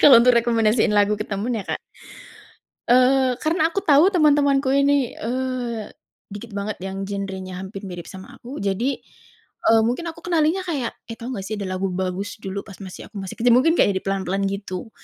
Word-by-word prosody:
kalau 260 -5 +9
untuk 245 0 +5
rekomendasiin 225 -2 +2
lagu 210 0 +3
ke 210 - -4
temen 215 +4 -2
ya 205 - -4
Kak? - - -3 1.1
Eee, 255 0 +4
karena 320 +1 +2
aku 335 - -2
tahu 305 +6 +6
temen-temenku 290 -5 +3
ini, 280 -2 +2
eee, 245 -2 -3 0.5
dikit 215 +3 -8
banget 205 +1 -3
yang 195 +1 -4
genrenya 190 -2 -5
hampir 195 +1 -8
mirip 175 -2 -8
sama 190 0 -11
aku. 255 +5 -9
Jadi, 205 +7 -1 0.7
eee, 225 0 +6
mungkin 250 +9 -2
aku 325 - -14
kenalinnya 335 +2 +2
kayak, 280 -8 -2 0.2
"Eh, - - -4
tahu 240 +2 -6
nggak 195 -4 -5
sih 215 - -3
ada 200 - -4
lagu 195 +1 -1
bagus 190 +3 -3
dulu 195 +1 -4
pas 200 - -10
masih 185 -2 -9
aku 210 - -15
masih 190 - -6
kecil," 240 +1 +4
mungkin 300 +7 +4
kayak 205 - +4
di - - -19
pelan-pelan 195 0 -1
gitu 200 +1 -5
225 Hz, 190 wpm, -22 LUFS, 195-265 Hz, 1.1 s, kalau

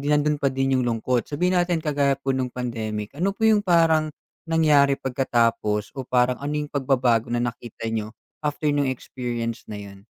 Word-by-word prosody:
nando'n 150 0 +2
pa 140 -2 0
din 135 0 +1
'yung 130 - +1
lungkot, 120 +1 0
sabihin 180 +5 0
natin 175 -2 +1
kagaya 140 -3 +1
po 135 -1 -1
no'ng 125 -1 -2
pandemic, 110 -2 -4
ano 190 +5 0
po 220 +3 +2
'yung 210 -2 +3
paran 160 -4 +3 0.3
nangyari 150 -4 +4
pagkatapos 115 -5 0
o 135 - -4
parang 125 0 +2
ano 145 +1 -4
'yung 150 -1 -2
pagbabago 125 -4 +1
na 120 - +1
nakita 120 -1 -4
niyo 110 -1 -3 0.3
after 150 +1 -1
no'ng 145 -2 +1
experience 120 -2 -5
na 105 - -6
'yun? 100 0 -12
135 Hz, 175 wpm, -24 LUFS, 120-150 Hz, 0.3 s, nangyari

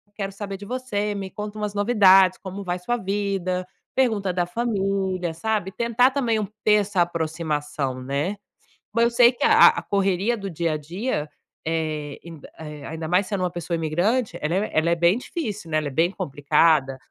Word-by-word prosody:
Quero 195 -1 -4
saber 195 0 -6
de 205 - -10
você, 210 -4 -2
me 195 -1 -5
conta 210 0 -6
umas 210 -1 -3
novidades. 195 -3 +5
Como 195 +1 -7
vai 180 0 -3
sua 240 +7 -1
vida?". 195 -3 -2 0.3
Pergunta 215 -8 +1
da 175 -1 0
família, 195 -4 -1
sabe. 200 +2 -2
Tentar 235 +4 +2
também 235 -6 0 0.2
ter 210 - +5
essa 200 -3 +1
aproximação, 155 -5 -2
né. 145 +10 -2 0.6
Mas 230 +1 +4
eu 235 - +3
sei 240 +1 +6
que 245 - -3
a 450 0 +8
a - - -1
correria 195 +3 +1
do 200 -3 -5
dia 165 -1 -1
a - - -1
dia, 165 - -3 0.4
eh, 155 -3 -2
ain 165 -3 -10 0.2
eh, 150 -2 -8
ainda 160 0 -5
mais 185 +3 +2
sendo 200 -3 -2
uma 180 - 0
pessoa 175 -1 -4
imigrante, 180 +10 0
ela 160 +3 0
é 205 +3 0
ela 165 +2 +2
é - - +4
bem 175 +6 +3
difícil, 210 - -5
né, 155 - +2
ela 150 -2 -2
é - - -5
bem 165 +6 +2
complicada, 145 -4 +2
190 Hz, 185 wpm, -23 LUFS, 165-210 Hz, 0.6 s, a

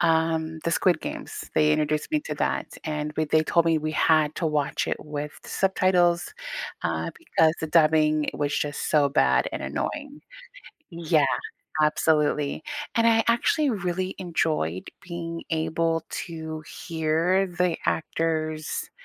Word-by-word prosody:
um, 160 -1 +1
the 170 - +1
Squid 175 +2 +2
Games, - - -6
they 150 0 +4
introduced 150 0 0
me 305 - +2
to - - -3
that, - - 0 0.2
and 150 -1 -3
we 155 - +2
they 155 +1 +3
told 170 +1 +2
me 165 -1 +3
we 155 0 -3
had 155 -1 +3
to 165 - 0
watch 150 -2 0
it - - 0
with 150 0 -5
subtitles, 180 -2 +2 0.5
uh, - - -1
because 160 - +2
the 160 - -3
dubbing 155 -1 +4
was 145 0 -1
just 145 -1 -2
so 145 -2 +4
bad 140 - +3
and - - -4
annoying. 290 -1 -4 0.7
Yeah, 165 -3 +2 0.6
absolutely, 150 - +1 0.3
and 230 - +3
I 225 -1 +4
actually 275 +6 +2
really 185 -2 -2
enjoyed 155 - -1
being 170 -1 -5
able 165 0 0 0.2
to 160 -2 -6
hear 165 +4 0
the 175 -1 0
actors' 155 -1 -1
160 Hz, 140 wpm, -25 LUFS, 155-175 Hz, 0.7 s, they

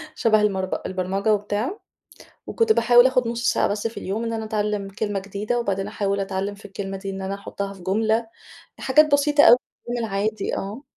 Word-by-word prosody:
شبه 215 -2 +3
المرض 190 -3 0
البرمجة 190 +3 0
وبتاع 210 - -2 0.7
وكنت 455 -1 +2
باحاول 240 - +6
آخُد 255 -2 +1
نص 235 +1 0
ساعة - - +1
بس 205 +2 -2
في 225 - -5
اليوم 210 +5 -3
إن 230 - -2
أنا 220 -1 -3
اتعلّم 210 -2 -2
كلمة 205 0 -3
جديدة، 200 +5 -3
وبعدين 195 -4 -2
احاول 200 -1 -1
اتعلّم 195 +1 -3
في 200 - -17
الكلمة 195 -1 -5
دي 195 0 -6
إن 195 0 -6
أنا 190 +1 -3
أحطّها 200 0 -5
في 190 - -14
جملة، 220 +4 +1 0.5
حاجات 300 +3 +4
بسيطة 290 +1 +4
أو 240 - +9 0.3
يومي 240 0 -2
العادي، 205 +1 -2
آه. 210 +7 -5
210 Hz, 185 wpm, -23 LUFS, 195-230 Hz, 0.7 s, أو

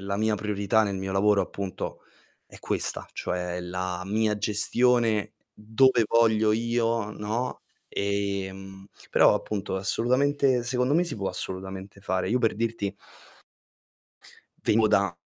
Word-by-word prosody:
la 100 0 -3
mia 110 +1 +1
priorità 105 +1 +1
nel 100 -2 -1
mio 95 0 -4
lavoro 100 +1 +3
appunto 100 -2 -5 0.5
è - - -14
questa, - - -3
cioè 90 0 -3
la 90 0 -4
mia 110 +1 +1
gestione 115 +1 +2 0.2
dove 115 +3 +3
voglio 110 -2 +3
io, 115 -1 0
no, 110 +4 -3 0.3
ehm, 95 -1 -3 0.2
però - - +5
appunto 100 -2 -3
assolutamente 130 +5 +1
secondo 125 +3 +1
me 175 +2 +3
si 170 - -5
può 100 -2 -2
assolutamente 95 +1 -6
fare. 95 0 -1
Io 125 - +3
per 115 -3 +1
dirti 110 -3 -2 1.7
vengo 110 0 +3
da 100 -4 +2
105 Hz, 125 wpm, -26 LUFS, 95-115 Hz, 1.7 s, però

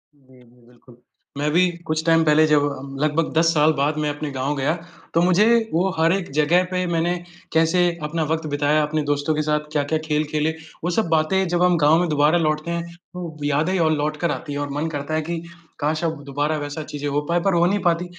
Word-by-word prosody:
जी, 130 -2 -22
जी, 120 +1 -24
बिल्कुल। 125 0 -19 0.4
मैं 145 +1 0
भी 180 +3 +4 0.2
कुछ 155 0 -1
टाइम 165 -1 +4
पहले 155 +1 +5
जब 150 -1 +4 0.2
हम 135 +1 -9
लगभग 155 +2 0
10 160 +1 +3
साल 155 0 +4
बाद 150 +1 0
मैं 150 -1 0
अपने 145 0 -4
गाँव 135 +2 -2
गया 140 +3 +1 0.4
तो 165 - +3
मुझे 185 +4 +4 0.3
वो 180 +4 +2
हर 165 +1 +4
एक 190 -2 -3
जगह 170 +4 +4
पे 180 0 0
मैंने 170 +2 +1 0.4
कैसे 165 +2 +3 0.2
अपना 160 +2 -1
वक़्त 160 -1 -1
बिताया, 145 +1 +1
अपने 155 +1 -1
दोस्तों 145 +2 0
के 155 - 0
साथ 150 0 -1
क्या-क्या 150 +1 0
खेल 150 -1 +1
खेले 155 +1 +1 0.3
वो 175 - 0
सब 220 - +2
बातें 165 +4 +2
जब 175 +1 +1
हम 180 -1 +4
गाँव 160 +3 +5
में 175 - +1
दोबारा 150 +3 +3
लौटते 155 +1 -1
हैं, 170 0 -2 0.3
तो 170 -3 -7
यादें 155 +6 +1
और 160 -2 +3
लौटकर 155 +3 -1
आती 145 - -5
है 145 - -3
और 145 0 -3
मन 160 - -1
करता 145 +2 -4
है 155 - +1
कि 170 -1 -2 0.4
काश 155 +2 -1
अब 160 -3 -2
दोबारा 145 +3 -1
वैसा 145 +2 -5
चीज़ें 145 -1 -5
हो 145 +1 0
पाए 170 +1 +2
पर 195 +2 +1
हो 170 0 +3
नहीं 200 +3 +1
पाती। 175 0 +1
155 Hz, 230 wpm, -22 LUFS, 145-170 Hz, 0.4 s, पहले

